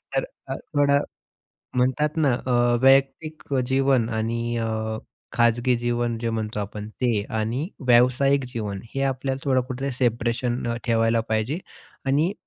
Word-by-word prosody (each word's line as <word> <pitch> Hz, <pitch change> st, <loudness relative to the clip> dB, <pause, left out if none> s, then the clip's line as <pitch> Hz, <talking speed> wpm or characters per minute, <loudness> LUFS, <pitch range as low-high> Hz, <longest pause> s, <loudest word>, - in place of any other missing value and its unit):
तर, -, -, +2 dB, 0.2 s
अ, -, -, -3 dB, 0.2 s
थोडं, 140 Hz, 0 st, +4 dB, 0.8 s
म्हणतात 140 Hz, +5 st, +1 dB
ना 150 Hz, -5 st, +3 dB
अ, -, -, -1 dB, 0.3 s
वैयक्तिक 135 Hz, +4 st, +3 dB, 0.2 s
जीवन 130 Hz, -3 st, +2 dB
आणि 115 Hz, +1 st, -1 dB
अ, 110 Hz, -1 st, -2 dB, 0.3 s
खाजगी 120 Hz, +1 st, +3 dB
जीवन 120 Hz, 0 st, -1 dB
जे 115 Hz, 0 st, -2 dB
म्हणतो 110 Hz, -1 st, -3 dB
आपण, 105 Hz, +1 st, -6 dB
ते 115 Hz, -2 st, 0 dB, 0.2 s
आणि 120 Hz, +9 st, -1 dB, 0.2 s
व्यावसायिक 130 Hz, +3 st, +4 dB
जीवन, 105 Hz, -4 st, -4 dB
हे 135 Hz, -, 0 dB
आपल्याला 135 Hz, 0 st, -1 dB
थोडं 130 Hz, -2 st, +3 dB
कुठे 135 Hz, +1 st, -3 dB
सेपरेशन 120 Hz, 0 st, 0 dB, 0.2 s
ठेवायला 115 Hz, -1 st, +2 dB
पाहिजे. 110 Hz, +8 st, 0 dB, 0.5 s
आणि 150 Hz, +7 st, +2 dB
120 Hz, 130 wpm, -24 LUFS, 115-135 Hz, 0.8 s, थोडं